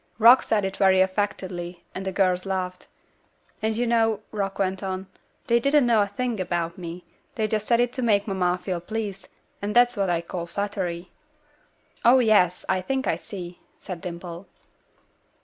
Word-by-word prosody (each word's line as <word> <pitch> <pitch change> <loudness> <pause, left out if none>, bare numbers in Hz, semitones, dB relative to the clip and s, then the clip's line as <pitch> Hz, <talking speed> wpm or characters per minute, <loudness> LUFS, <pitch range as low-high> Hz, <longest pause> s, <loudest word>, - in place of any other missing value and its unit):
'" - - -39
Rock 235 +3 +8
said 210 -2 +1
this 190 0 -3
very 190 -1 +4
affectedly, 185 -2 -1
and 190 - -5
the 190 - -2
girls 185 -1 +1
laughed. 185 -2 -3 0.7
"And 220 0 0
you 245 - +1
know," 225 -2 +2
Rock 195 -2 -3
went 190 -1 -1
on, 190 -1 -3 0.4
"they 235 0 +3
didn't 280 +2 +3
know 230 -3 +4
a 200 - +1
thing 230 +2 -3
about 170 -2 -2
me; 175 0 -8 0.3
they 215 -1 0
just 215 0 -2
said 235 -1 +4
it 245 0 +1
to 260 - -3
make 210 -4 +2
mamma 180 -2 +1
feel 180 -1 -4
pleased, 200 -1 -5 0.3
and 205 +2 -3
that's 245 0 +5
what 195 -2 0
I 170 -1 +1
call 170 0 -5
flattery." 180 -2 -3 0.9
"Oh, 245 +3 +7
yes; 210 -7 +3
I 185 - +1
think 265 +7 -2
I - - +1
see," 180 -3 -8 0.2
said 180 -3 -7
Dimple. 175 0 -7
195 Hz, 180 wpm, -25 LUFS, 180-220 Hz, 0.9 s, Rock